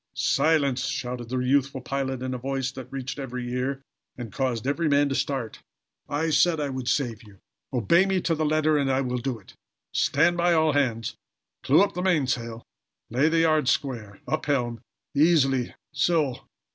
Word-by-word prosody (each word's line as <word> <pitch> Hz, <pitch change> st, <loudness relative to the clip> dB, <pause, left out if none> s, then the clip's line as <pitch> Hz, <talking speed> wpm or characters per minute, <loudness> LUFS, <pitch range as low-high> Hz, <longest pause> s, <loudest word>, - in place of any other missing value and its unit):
"Silence!" 140 Hz, -5 st, +2 dB
shouted 125 Hz, -1 st, -4 dB
the 130 Hz, -, -2 dB
youthful 135 Hz, +1 st, +1 dB
pilot, 130 Hz, 0 st, -3 dB
in 130 Hz, 0 st, -3 dB
a -, -, -2 dB
voice 135 Hz, 0 st, -2 dB
that 130 Hz, -2 st, -10 dB
reached 135 Hz, +1 st, -5 dB
every 125 Hz, -2 st, -5 dB
ear, 135 Hz, +2 st, -2 dB, 0.3 s
and 115 Hz, -5 st, -7 dB
caused 125 Hz, -4 st, -1 dB
every 150 Hz, +4 st, 0 dB
man 145 Hz, 0 st, +4 dB
to 140 Hz, -, -2 dB
start. 135 Hz, -4 st, -2 dB, 0.5 s
"I 160 Hz, +3 st, 0 dB
said 160 Hz, +1 st, +3 dB
I 145 Hz, -1 st, -1 dB
would 130 Hz, -2 st, -5 dB
save 120 Hz, -6 st, 0 dB
you. 105 Hz, -3 st, -16 dB, 0.3 s
Obey 150 Hz, -, +3 dB
me 190 Hz, -1 st, +1 dB
to 170 Hz, -, +1 dB
the 160 Hz, 0 st, -1 dB
letter 155 Hz, 0 st, +2 dB
and 135 Hz, -1 st, +1 dB
I 130 Hz, +1 st, +2 dB
will 125 Hz, -1 st, -2 dB
do 125 Hz, 0 st, -3 dB
it. 100 Hz, -, -17 dB, 0.4 s
Stand 165 Hz, +5 st, +2 dB
by, 175 Hz, 0 st, +3 dB
all 160 Hz, -2 st, +3 dB
hands! 120 Hz, -6 st, 0 dB, 0.4 s
Clew 150 Hz, +8 st, +5 dB
up 200 Hz, -, -1 dB
the 180 Hz, -, -3 dB
mainsail! 130 Hz, -10 st, 0 dB, 0.5 s
Lay 135 Hz, +7 st, +3 dB
the 165 Hz, 0 st, +2 dB
yards 155 Hz, -5 st, +3 dB
square! 110 Hz, -8 st, -2 dB
Up 155 Hz, -, -2 dB
helm! 120 Hz, -5 st, 0 dB, 0.3 s
Easily! 140 Hz, -5 st, +3 dB, 0.2 s
So!" 150 Hz, -2 st, 0 dB
135 Hz, 180 wpm, -26 LUFS, 125-155 Hz, 0.5 s, Clew